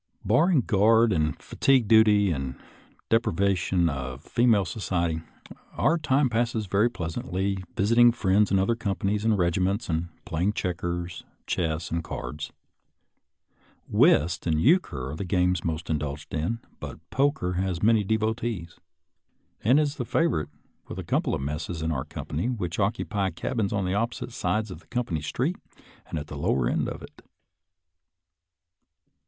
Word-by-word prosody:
Barring 150 - +4
guard 110 +1 +4
and 80 -3 0
fatigue 130 -5 +2
duty 105 -3 +5
and 65 -4 -3 0.6
the 115 - +6
depri 110 - -3 0.2
vation 90 -1 +1
of 65 -4 -4
female 115 -5 +3
society, 85 -6 -1 0.5
our 165 +1 +2
time 135 -2 +2
passes 115 -2 0
very 100 +5 +2
pleasantly 95 0 -3
visiting 115 +4 +5
friends 105 -3 +2
in 95 - +3
other 95 +5 +2
companies 105 -2 -1
and 110 -2 +2
regiments 90 +4 0
and 80 +1 -1 0.2
playing 90 +6 0
checkers, 85 -2 -3 0.2
chess, 80 -1 -2
and 85 0 -1
cards. 75 -1 -6 1.4
Whist 85 +3 +3
and 80 -2 +2
euchre 80 - +2
are - - -5
the 90 - -4
games 90 -2 +1
most 80 0 -3
indulged 75 -1 -3
in, 85 +9 -2 0.2
but - - -7
poker 135 -10 +1
has 90 -2 -2
many 110 -1 +4
devotees, 110 -4 -2 0.8
and 125 +7 +5
is 150 -1 0
the 125 - -2
favorite 115 - 0 0.4
with - - -7
a - - -4
couple - - 0
of - - -4
messes 75 +3 -4
of 80 - 0
our 65 -4 -2
com - - -7
pany 115 - -2
which 90 -2 -3
occupy 100 -1 0
cabins 110 -1 -2
on 100 -4 -1
opposite 115 +4 -2
sides 110 -2 -1
of 90 - -8
the - - -24
company 105 -11 -2
street 130 - -1 0.5
and - - -4
at 75 - -4
the - - -9
lower 65 -2 +1
end - - 0
of - - -7
it. - - -13
95 Hz, 150 wpm, -26 LUFS, 85-115 Hz, 1.4 s, the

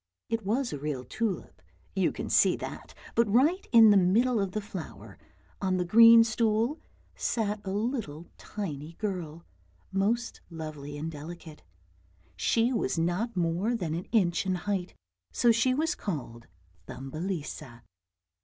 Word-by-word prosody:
It 225 -1 -1
was 235 +6 -1
a 145 - -4
real 145 -3 -3
tulip, 215 - -4 0.3
you - - +2
could - - -5
see - - +5
that; - - -8 0.2
but 230 -3 +2
right 305 - +3
in 225 -3 +8
the 205 - +6
middle 220 +6 +3
of 195 -2 -2
the 215 - -1
flower 200 -5 -9 0.4
on 185 -2 +1
the 180 - 0
green 230 +4 +8
stool 225 +5 0 0.3
sat 210 -2 -1
a 195 - -5
little 205 - -3
tiny 160 -7 -6
girl, 170 -5 -5 0.5
most 220 +5 -1
lovely 155 -3 -7
and 160 +2 -4
delicate; 160 +1 -10 0.7
she 235 +2 +1
was 150 - -1
not 180 +7 -1
more 175 +7 0
than 170 -8 -3
an 170 +3 -4
inch 180 -7 +1
in 190 -1 0
height, 190 -1 -3 0.4
so 240 - +4
she 245 +3 +2
was 320 +4 +1
called 130 - -6 0.4
Thumbelisa. 150 -4 -6
195 Hz, 145 wpm, -28 LUFS, 165-230 Hz, 0.7 s, in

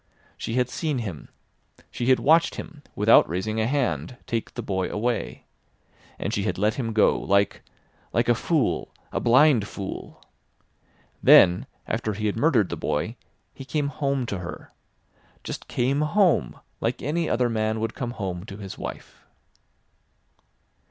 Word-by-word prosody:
She 115 - -4
had 125 -1 +2
seen 150 +1 -2
him. 100 - -6 0.6
She 120 - -3
had 130 - +6
watched 165 +4 +4
him, 160 -5 -9
without 105 +3 +5
raising 110 +6 -1
a 110 - +1
hand, 130 -2 -1
take 115 -1 -3
the 120 - -4
boy 95 -3 -1
away. 115 +2 -2 0.7
And - - -3
she - - 0
had - - -2
let 105 +3 +2
him 115 -3 -3
go, 110 -1 +3
like—like 100 0 -2
a - - +5
fool—a - - -1
blind 125 -3 +4
fool. 100 -2 -7 1.0
Then 90 0 +6 0.2
after 110 - -2
he 105 +2 -4
had 105 - 0
murdered 115 - +3
the - - -3
boy 75 +11 -2 0.4
he 135 - -9
came 140 +2 -1
home 140 -2 -1
to 100 -5 -4
her. 85 -1 -8 0.7
Just - - -6
came 135 +4 0
home 170 - +2 0.2
like - - -2
any 160 +5 -1
other 125 0 +2
man 110 -1 -1
would 110 0 -2
come 120 - -4
home 90 -4 -4
to 100 - -8
his 100 -2 -8
wife. - - -8
115 Hz, 150 wpm, -25 LUFS, 105-135 Hz, 1.0 s, had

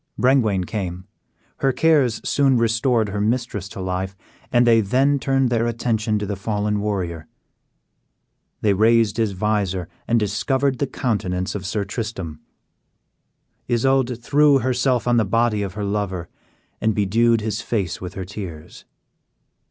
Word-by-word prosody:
Brengwain 115 -8 +3
came; 90 -3 -4 0.5
her 135 - +2
cares 145 -5 +2
soon 135 -3 +3
restored 115 -1 +1
her 100 +1 -2
mistress 110 -3 -1
to 100 - -9
life, 95 +1 -3 0.3
and 120 0 +4
they 115 -1 +5
then 135 +7 +2
turned 135 -2 +1
their 115 0 +1
attention 115 -2 0
to 105 - -2
the 100 0 -3
fallen 105 +1 -1
warrior. 90 -6 -3 1.3
They 105 -2 +3
raised 110 +1 +3
his 110 -3 0
visor, 95 -3 -1 0.2
and 120 0 +3
discovered 130 +6 0
the 140 - 0
countenance 95 -8 -2
of 100 -3 -5
Sir 100 +1 -2
Tristram. 95 -7 -5 1.3
Isoude 125 0 +1
threw 145 +1 +4
herself 125 -1 0
on 120 0 +3
the 115 - +4
body 115 +1 +1
of 95 -2 -4
her 105 -1 -3
lover, 100 -4 -3 0.5
and 110 -1 +1
bedewed 115 +3 +2
his 110 0 -2
face 105 -6 -2
with 90 -1 -7
her 95 - -5
tears. 90 -6 -9
110 Hz, 145 wpm, -22 LUFS, 100-120 Hz, 1.3 s, they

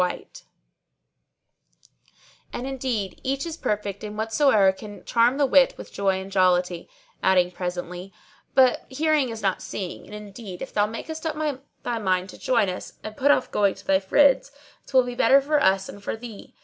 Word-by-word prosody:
'[FN#626] 180 -1 -4 2.1
And 245 - -4
indeed 255 -7 -3
each 270 +2 -1
is 330 -2 -5
perfect 205 - -3
in 210 0 -6
whatso 220 -2 +3
can 205 +2 -11
charm 235 +3 +3
the 290 - +3
wit 270 0 +4
with - - -11
joy 195 -1 +1
and 190 +1 -8
jollity;" 180 -2 +1 0.3
adding 180 -1 +3
presently, 180 +1 -5 0.4
"But 260 -2 +4
hearing 295 0 +1
is 225 -1 -7
not 195 -2 0
seeing; 185 -3 -6
and 210 - -9
indeed 205 -2 -8
if - - -9
thou 205 0 +2
make 225 +1 -7
up 310 -3 -3 0.2
thy 235 -2 -2
mind 185 -2 0
to - - -12
join 230 -5 +2
us 185 0 -5
and 215 0 -7
put 280 +5 +1
off 290 - +3
going 200 -2 +2
to - - -15
thy 190 -1 +3
friends, 275 +11 +3 0.4
'twill 260 -2 +4
be 245 0 -5
better 255 +3 +5
for 295 +2 +1
us 190 -4 +3
and 200 - -11
for 225 - -3
thee. 225 -3 -11
215 Hz, 175 wpm, -24 LUFS, 190-265 Hz, 2.1 s, better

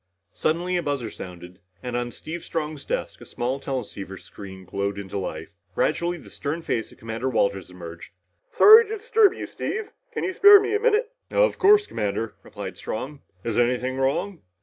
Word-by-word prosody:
Suddenly 175 +3 0
a - - 0
buzzer 140 -7 -2
sounded, 90 0 -10 0.2
and 125 -1 -4
on 120 0 -1
Steve 160 +7 -7
Strong's 155 -3 -4
desk - - -3
a - - -10
small 125 +3 -2
teleceiver 105 -8 -5
screen 95 -2 -11
glowed 100 +2 -2
into 100 0 -4
life. 80 -4 -5 0.3
Gradually 175 +1 0
the - - -14
stern 155 +4 -4
face 115 -7 -2
of - - -17
Commander 115 +3 -3
Walters 100 -6 0
emerged. 85 -2 -10 0.5
"Sorry 445 +2 +9
to 440 +1 -4
disturb 440 -2 +4
you, - - -5
Steve. 430 0 -4 0.2
Can - - -3
you 375 - -1
spare 405 +2 +9
me 410 +1 -2
a - - +2
minute?" 460 0 +2 0.2
"Of - - +2
course, 410 +1 +6
Commander," 105 - -3
replied 95 -3 -8
Strong. 135 +6 -5 0.2
"Is 115 0 0
anything 125 +2 +1
wrong?" 160 +7 -1
130 Hz, 175 wpm, -24 LUFS, -, 0.5 s, Sorry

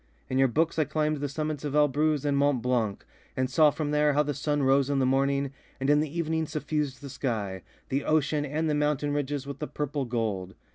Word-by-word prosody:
In 130 - +1
your 135 - +5
books 160 +6 0
I 155 - +3
climbed 155 +1 0
the 145 0 -3
summits 150 +1 -3
of 145 -1 -3
Elbruz 150 0 +2
and 145 -1 +2
Mont 140 -2 +3
Blanc 120 -5 0 0.3
and 130 0 +1
saw 155 +2 +6
from 150 0 -3
there 150 0 +3
how 150 +1 +3
the 145 0 -2
sun 145 0 -1
rose 135 +1 +3
in 140 - +1
the 135 - +2
morning, 140 +1 +1 0.3
and 135 +2 +2
in 145 - +5
the 155 +2 -2
evening 160 -1 0
suffused 150 -3 -2
the 140 - -7
sky, 105 -9 -3 0.3
the 140 +1 0
ocean 150 -1 +1
and 150 +3 -1
the 150 - +1
mountain 150 -1 0
ridges 145 -1 -2
with 140 +1 -7
a 150 - -2
purple 145 -1 -3
gold. 110 -6 -2
145 Hz, 225 wpm, -28 LUFS, 135-150 Hz, 0.3 s, saw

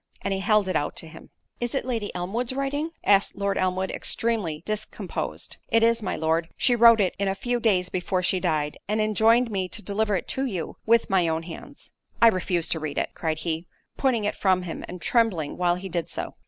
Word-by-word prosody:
And 195 - 0
he 190 - -1
held 210 0 +3
it 185 - -1
out 145 - -1
to 165 - -5
him. 160 - -13 0.3
"Is 240 +2 -3
it 270 - -1
Lady 230 -5 -2
Elmwood's 225 +8 -2
writing?" 280 +3 -1
asked 200 -1 +3
Lord 200 0 -1
Elmwood, 185 0 0
extremely 200 -10 -1
discomposed. 215 0 -4
"It 225 0 +4
is, 230 0 +3
my - - -2
Lord.—She 165 +9 +1
wrote 230 -1 +7
it 190 -3 +2
a 195 -1 0
few 245 +4 -1
days 190 -6 +2
before 185 0 -1
she 185 +1 +1
died, 155 -5 -1
and 210 +1 0
enjoined 220 +3 +3
me 190 -2 -1
to 215 - -7
deliver 210 0 0
it 180 - -3
to 270 - -1
you, 190 -10 -4
with 230 +1 +4
my 185 -3 +2
own 160 0 -1
hands." 180 - -10 0.3
"I 230 - +8
refuse 180 -4 0
to 160 - 0
read 155 -2 -4
it:" - - -1
cried 160 -2 -2
he, 165 +1 -3 0.3
putting 255 -5 +1
it 210 - -1
from 185 -2 +2
him—and 180 +1 -7
trembling 205 -11 +1
while 175 -1 +2
he 185 +2 -6
did 170 -2 -3
so. - - -4
195 Hz, 210 wpm, -25 LUFS, 175-230 Hz, 0.3 s, I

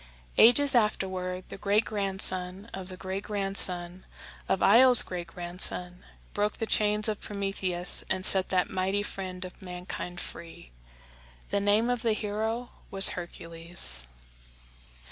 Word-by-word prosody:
Ages 275 +5 +6
afterward, 185 -5 -1
the - - -10
great 205 +3 +1
grandson 195 0 -1
of 190 -1 -7
the 185 - -6
great 190 +1 -5
grandson 190 -3 0 0.5
of 190 - 0
Io's 245 +4 +8
great 175 -2 -7
grandson 180 +1 -3 0.3
broke 210 +1 -2
the 225 - -3
chains 210 0 +1
of 215 -1 -4
Prometheus 195 -3 0
and 185 0 -2
set 190 -1 +5
that 185 -1 -1
mighty 190 +2 -2
friend 185 -2 -7
of 185 - -12
mankind 180 -1 -7
free. 165 - -10 0.8
The 200 - 0
name 205 +3 +2
of 245 -2 -3
the 230 -3 0
hero 220 +3 -4 0.2
was 195 0 +6
Hercules. 165 - -4
190 Hz, 130 wpm, -27 LUFS, 180-210 Hz, 0.8 s, Io's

